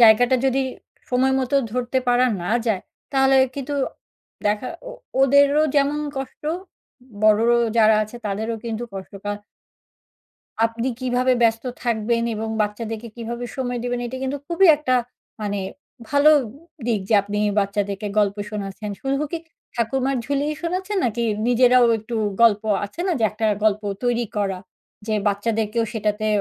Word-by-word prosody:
জায়গাটা 235 Hz, +3 st, +6 dB
যদি 265 Hz, +1 st, +2 dB, 0.5 s
সময় 260 Hz, +1 st, +3 dB
মতো 260 Hz, +2 st, +1 dB, 0.2 s
ধরতে 250 Hz, +1 st, 0 dB
পারা 245 Hz, +1 st, +4 dB, 0.2 s
না 180 Hz, -, -3 dB, 0.2 s
যায়, 205 Hz, -5 st, +1 dB, 0.3 s
তাহলে 270 Hz, 0 st, +4 dB, 0.2 s
কিন্তু 280 Hz, +1 st, -4 dB, 0.7 s
দেখা 210 Hz, +4 st, 0 dB, 0.2 s
ও -, -, -6 dB, 0.3 s
ওদেরও 280 Hz, +2 st, +5 dB
যেমন 285 Hz, +1 st, +2 dB, 0.2 s
কষ্ট, 270 Hz, -1 st, -6 dB, 0.8 s
বড় 215 Hz, 0 st, +5 dB
র -, -, +5 dB, 0.3 s
যারা 220 Hz, -1 st, +6 dB
আছে 215 Hz, +3 st, -7 dB
তাদেরও 220 Hz, +3 st, -2 dB
কিন্তু 230 Hz, 0 st, -3 dB
কষ্ট। 190 Hz, -1 st, -8 dB
কা 205 Hz, -, -1 dB, 1.3 s
আপনি 230 Hz, +2 st, -3 dB
কিভাবে 255 Hz, 0 st, +2 dB
ব্যস্ত 225 Hz, 0 st, +2 dB, 0.2 s
থাকবেন 230 Hz, -1 st, 0 dB
এবং 220 Hz, +1 st, -3 dB
বাচ্চাদেরকে 220 Hz, +2 st, -4 dB
কিভাবে 235 Hz, +1 st, -5 dB
সময় 245 Hz, -2 st, -2 dB
দিবেন 245 Hz, 0 st, -2 dB
এটা 250 Hz, +2 st, -6 dB
কিন্তু 265 Hz, +2 st, -2 dB
খুবই 345 Hz, +4 st, +4 dB
একটা 285 Hz, -4 st, 0 dB, 0.5 s
মানে 205 Hz, -1 st, -2 dB, 0.5 s
ভালো 285 Hz, +1 st, +5 dB, 0.6 s
দিক 225 Hz, -4 st, +1 dB
যে 225 Hz, -, +3 dB
আপনি 205 Hz, +1 st, -3 dB, 0.2 s
বাচ্চাদেরকে 200 Hz, 0 st, -2 dB
গল্প 200 Hz, -1 st, +2 dB
শোনাচ্ছেন। 205 Hz, 0 st, -5 dB
শুধু 275 Hz, +1 st, -1 dB
কি 335 Hz, -, -1 dB, 0.4 s
'ঠাকুরমার 260 Hz, +3 st, 0 dB
ঝুলি'-ই 285 Hz, +3 st, -1 dB
শোনাচ্ছেন 375 Hz, +4 st, -2 dB
নাকি 235 Hz, 0 st, 0 dB, 0.2 s
নিজেরাও 245 Hz, 0 st, +5 dB
একটু 220 Hz, +2 st, -5 dB, 0.3 s
গল্প, 215 Hz, -3 st, +5 dB, 0.2 s
আছে 205 Hz, +11 st, -8 dB
না 370 Hz, -, +2 dB
যে -, -, +3 dB
একটা 220 Hz, +1 st, -2 dB, 0.2 s
গল্প 215 Hz, 0 st, +2 dB, 0.2 s
তৈরী 240 Hz, -1 st, +1 dB
করা, 195 Hz, -2 st, 0 dB, 0.5 s
যে 220 Hz, -, 0 dB
বাচ্চাদেরকেও 215 Hz, +2 st, 0 dB
সেটাতে 215 Hz, -1 st, -1 dB
235 Hz, 145 wpm, -22 LUFS, 215-265 Hz, 1.3 s, জায়গাটা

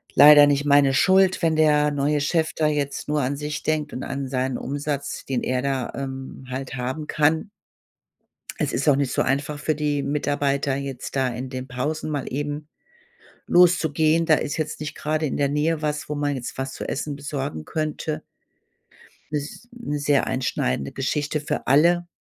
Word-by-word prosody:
leider 145 Hz, +1 st, +9 dB
nicht 145 Hz, 0 st, +1 dB
meine 140 Hz, -2 st, +5 dB
Schuld, 190 Hz, +3 st, +4 dB
wenn 165 Hz, -2 st, +2 dB
der 150 Hz, -1 st, +4 dB
neue 145 Hz, +1 st, +1 dB
Chef 160 Hz, +2 st, 0 dB
da 155 Hz, -, +2 dB
jetzt 145 Hz, -2 st, -2 dB
nur 150 Hz, 0 st, +1 dB
an 135 Hz, +2 st, -1 dB
sich 150 Hz, +1 st, -4 dB
denkt 155 Hz, -1 st, -1 dB
und 130 Hz, -, -5 dB
an 140 Hz, 0 st, -4 dB
seinen 130 Hz, 0 st, -1 dB
Umsatz, 140 Hz, 0 st, -4 dB
den 130 Hz, -3 st, -2 dB
er 130 Hz, 0 st, 0 dB
da, 135 Hz, -2 st, -2 dB
ähm, 135 Hz, -1 st, -6 dB
halt 130 Hz, +1 st, -5 dB
haben 130 Hz, +5 st, -4 dB
kann. 155 Hz, +6 st, +1 dB, 1.1 s
Es -, -, -1 dB
ist 140 Hz, +4 st, +1 dB
auch 140 Hz, -, +5 dB
nicht 140 Hz, -2 st, 0 dB
so -, -, +1 dB
einfach 145 Hz, +2 st, -1 dB
für 155 Hz, +1 st, 0 dB
die 150 Hz, -1 st, 0 dB
Mitarbeiter, 140 Hz, -1 st, 0 dB
jetzt 135 Hz, -2 st, -5 dB
da 135 Hz, -1 st, +2 dB
in 125 Hz, +2 st, -5 dB
den 130 Hz, 0 st, -6 dB
Pausen 145 Hz, +6 st, -3 dB
mal 145 Hz, -4 st, -2 dB
eben 145 Hz, +2 st, -4 dB, 0.8 s
loszugehen. 165 Hz, -2 st, +4 dB
Da 155 Hz, -, +6 dB
ist 145 Hz, +1 st, -3 dB
jetzt 155 Hz, -1 st, -3 dB
nicht 150 Hz, 0 st, -5 dB
grade 155 Hz, +1 st, -1 dB
in 140 Hz, -, -2 dB
der 140 Hz, -1 st, +1 dB
Nähe 150 Hz, +2 st, 0 dB
was, 150 Hz, -1 st, -2 dB
wo 150 Hz, -, -2 dB
man 145 Hz, -1 st, -1 dB
jetzt 125 Hz, -2 st, -6 dB
was 135 Hz, 0 st, -3 dB
zu -, -, -6 dB
Essen 145 Hz, +1 st, -3 dB
besorgen 140 Hz, -, -5 dB
könnte. 155 Hz, 0 st, -3 dB, 1.1 s
Ist 150 Hz, +10 st, -5 dB
'ne 235 Hz, -12 st, -4 dB
sehr 145 Hz, -1 st, +2 dB
einschneidende 70 Hz, -, -1 dB
Geschichte 145 Hz, +3 st, -1 dB
für 150 Hz, -, -3 dB
alle. 170 Hz, +6 st, +4 dB
145 Hz, 180 wpm, -23 LUFS, 135-155 Hz, 1.1 s, leider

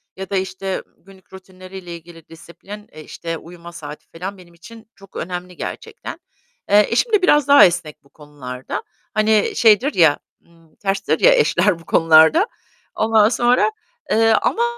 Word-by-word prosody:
ya 190 Hz, -1 st, -8 dB
da 200 Hz, -, -3 dB
işte 190 Hz, 0 st, -4 dB
günlük 190 Hz, 0 st, -21 dB
rutinleriyle 185 Hz, -1 st, -11 dB
ilgili 165 Hz, -1 st, -15 dB
disiplin; 175 Hz, +6 st, -12 dB
eee, 155 Hz, -, -12 dB
işte, 165 Hz, +1 st, -6 dB
uyuma 170 Hz, +1 st, -13 dB
saati 150 Hz, -2 st, -11 dB
falan 190 Hz, +4 st, -8 dB
benim 170 Hz, -2 st, -18 dB
için 225 Hz, +6 st, -15 dB
çok 195 Hz, -1 st, -19 dB
önemli 180 Hz, +1 st, -6 dB
gerçekten. -, -, -8 dB, 0.5 s
Eee, 205 Hz, 0 st, +5 dB
eşim 435 Hz, -, 0 dB
de 415 Hz, -, +4 dB
biraz 295 Hz, -6 st, +3 dB
daha 285 Hz, -5 st, +8 dB
esnek 170 Hz, -5 st, -3 dB
bu 140 Hz, -, -26 dB
konularda. 140 Hz, -4 st, -8 dB, 0.3 s
Hani 215 Hz, -1 st, +1 dB
şeydir 235 Hz, +6 st, +3 dB
ya, 160 Hz, -5 st, +3 dB, 0.3 s
ımm, 165 Hz, -2 st, -26 dB
terstir 195 Hz, 0 st, -2 dB
ya, -, -, +6 dB
eşler 460 Hz, -, +1 dB
bu 165 Hz, -, -18 dB
konularda. 165 Hz, -, +4 dB, 0.5 s
Ondan 220 Hz, -1 st, +3 dB
sonra, 245 Hz, -, +2 dB, 0.4 s
eee, 225 Hz, 0 st, +3 dB
ama 470 Hz, -, 0 dB
185 Hz, 155 wpm, -19 LUFS, 165-215 Hz, 0.5 s, daha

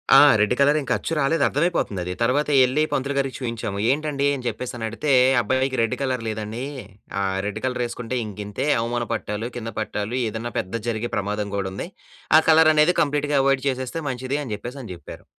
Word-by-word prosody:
ఆ! -, -, +10 dB, 0.2 s
Red 105 Hz, +3 st, +3 dB
colour 145 Hz, +2 st, +5 dB
ఇంక -, -, -5 dB
అచ్చు 165 Hz, -, -4 dB
రాలేదు 150 Hz, +3 st, +2 dB
అర్థమైపోతుందది. 105 Hz, -, -1 dB
తర్వాత 140 Hz, +6 st, +2 dB
యెళ్లి 130 Hz, +4 st, +4 dB
పంతులు 140 Hz, +1 st, -1 dB
గారికి 135 Hz, -1 st, -1 dB
చూయించాము. 115 Hz, -5 st, -4 dB
ఏంటండీ? 145 Hz, -1 st, 0 dB
అని 125 Hz, -2 st, -8 dB
చెప్పేసి 120 Hz, +2 st, -4 dB
అని 115 Hz, -, -3 dB
అడిగితే! 135 Hz, +6 st, -2 dB, 0.3 s
అబ్బాయికి 130 Hz, +3 st, 0 dB
రెడ్ 115 Hz, +2 st, +1 dB
కలర్ 130 Hz, -3 st, -1 dB
లేదనీ 110 Hz, +3 st, -4 dB, 0.6 s
ఆహ్, 95 Hz, 0 st, -1 dB
రెడ్ 105 Hz, +1 st, -3 dB
కలర్ 125 Hz, -1 st, -1 dB
యేసుకుంటే 125 Hz, +1 st, -4 dB
ఇంకింతే 105 Hz, +5 st, -4 dB
అవమాన 120 Hz, 0 st, -2 dB
పట్టాలు, 110 Hz, +1 st, -3 dB
కింద 115 Hz, -1 st, -5 dB
పట్టాలు 105 Hz, +2 st, -3 dB
ఏదన్నా 115 Hz, +2 st, -4 dB
పెద్దది 110 Hz, +4 st, -4 dB
జరిగే 115 Hz, +1 st, -2 dB
ప్రమాదం 105 Hz, +1 st, -2 dB
గూడా 95 Hz, -1 st, -1 dB
ఉంది. 100 Hz, -, -5 dB, 0.5 s
ఆ -, -, +9 dB
కలర్ 160 Hz, 0 st, +7 dB
అనేది 155 Hz, +4 st, +4 dB
కంప్లీట్‌గా 145 Hz, -1 st, +1 dB
అవాయిడ్ 135 Hz, -1 st, +2 dB
చేసేస్తే 130 Hz, +5 st, -3 dB
మంచిదని 130 Hz, +2 st, -3 dB, 0.2 s
జెప్పేసని 120 Hz, 0 st, -8 dB
చెప్పారు. 85 Hz, -, -12 dB
125 Hz, 175 wpm, -23 LUFS, 110-140 Hz, 0.6 s, ఆ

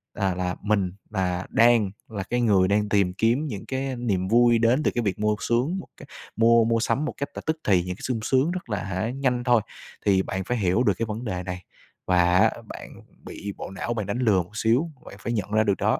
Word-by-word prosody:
là 95 Hz, -2 st, 0 dB
là 90 Hz, 0 st, -2 dB
mình 100 Hz, -3 st, +1 dB, 0.2 s
là 90 Hz, -3 st, -1 dB
đang 115 Hz, -4 st, +4 dB, 0.2 s
là 100 Hz, -3 st, -4 dB
cái 120 Hz, +5 st, -1 dB
người 100 Hz, -5 st, +4 dB
đang 105 Hz, +1 st, +1 dB
tìm 100 Hz, -4 st, +2 dB
kiếm 115 Hz, +9 st, +1 dB
những 105 Hz, -8 st, -6 dB
cái, 135 Hz, +1 st, -2 dB
a, 130 Hz, -, -3 dB
niềm 100 Hz, -7 st, -1 dB
vui 120 Hz, +2 st, +5 dB
đến 120 Hz, +6 st, +3 dB
từ -, -, +2 dB
cái 120 Hz, -, +1 dB
việc 100 Hz, -2 st, -2 dB
mua 105 Hz, 0 st, +1 dB
xuống 130 Hz, +11 st, 0 dB
một -, -, -10 dB
cái 140 Hz, -, -12 dB, 0.3 s
mua 115 Hz, 0 st, +5 dB
mua 115 Hz, 0 st, +2 dB
sắm 120 Hz, +5 st, 0 dB
một -, -, -3 dB
cách 140 Hz, -, -3 dB
là -, -, -5 dB
tức 160 Hz, 0 st, 0 dB
thì, 95 Hz, -4 st, +4 dB
những 90 Hz, 0 st, -4 dB
cái -, -, -16 dB
sung 125 Hz, -3 st, -1 dB
sướng 130 Hz, +7 st, +2 dB
rất 180 Hz, -7 st, -6 dB
là, 105 Hz, -4 st, -2 dB
hả, 95 Hz, +4 st, -2 dB
nhanh 125 Hz, -2 st, -1 dB
thôi. 120 Hz, -2 st, +4 dB, 0.4 s
Thì 95 Hz, -2 st, +4 dB
bạn 95 Hz, 0 st, -3 dB
phải 125 Hz, +5 st, -2 dB
hiểu 100 Hz, +3 st, +2 dB
được 105 Hz, -5 st, +3 dB
cái 115 Hz, -, 0 dB
vấn 110 Hz, +2 st, -5 dB
đề 90 Hz, -5 st, -3 dB
này 90 Hz, 0 st, -6 dB, 0.4 s
và 90 Hz, -1 st, +3 dB
á, 110 Hz, +2 st, +5 dB
bạn -, -, -9 dB, 0.4 s
bị 100 Hz, 0 st, -6 dB
bộ -, -, -7 dB
não 120 Hz, +4 st, -3 dB
bạn 105 Hz, -3 st, -2 dB
đánh 100 Hz, +4 st, -2 dB
lừa 105 Hz, -8 st, +3 dB
một 105 Hz, +5 st, -13 dB
xíu, 125 Hz, +10 st, +1 dB
bạn -, -, -10 dB
phải 115 Hz, +3 st, -3 dB
nhận 105 Hz, -3 st, -3 dB
ra 110 Hz, 0 st, +3 dB
được 100 Hz, -3 st, +1 dB
đó, -, -, +1 dB
110 Hz, 250 wpm, -25 LUFS, 95-120 Hz, 0.4 s, vui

